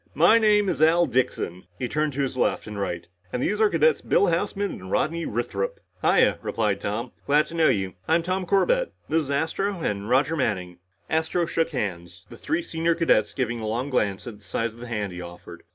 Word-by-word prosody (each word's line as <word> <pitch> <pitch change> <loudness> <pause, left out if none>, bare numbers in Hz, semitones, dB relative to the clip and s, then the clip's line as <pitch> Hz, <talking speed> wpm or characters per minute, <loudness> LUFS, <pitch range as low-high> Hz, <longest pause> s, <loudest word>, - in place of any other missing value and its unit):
"My 175 +10 +6
name 210 -2 +4
is 170 - -1
Al 165 +2 +5
Dixon," 120 - -1
he 125 - -2
turned 150 +2 -1
to 140 - -1
his 130 - -3
left 130 - 0
and 105 -1 -6
right, 85 -3 -3 0.3
"and 125 - -2
these 210 +1 0
are 215 - +5
cadets 160 -3 +3
Bill - - +3
Houseman 195 +3 0
and 95 0 -9
Rodney 165 - 0
Withrop." 105 -4 -2 0.2
"Hiya," - - +4
replied 105 -3 -1
Tom. 115 +4 -3 0.2
"Glad 150 +2 +4
to 165 - -12
know 165 -1 +4
you. 95 -6 0
I'm 165 +1 +3
Tom 185 +1 -2
Corbett. - - +2 0.2
This 160 +1 +2
is 145 - -7
Astro 170 +7 -1
and 100 -5 -2
Roger 140 +5 +3
Manning." 90 - -2 0.3
Astro 160 +2 0
shook 165 0 0
hands, 90 - -5
the - - -10
three 330 +2 -1
senior 165 - 0
cadets 110 -11 +2
giving 120 +1 -2
a 110 - -4
long 125 +6 -2
glance 100 -5 0
at 110 -4 -8
the - - -23
size 115 +3 -2
of 115 - -16
the 120 - -8
hand 105 -5 -3
he 90 - -6
offered. 85 0 -10
135 Hz, 215 wpm, -25 LUFS, 105-165 Hz, 0.3 s, My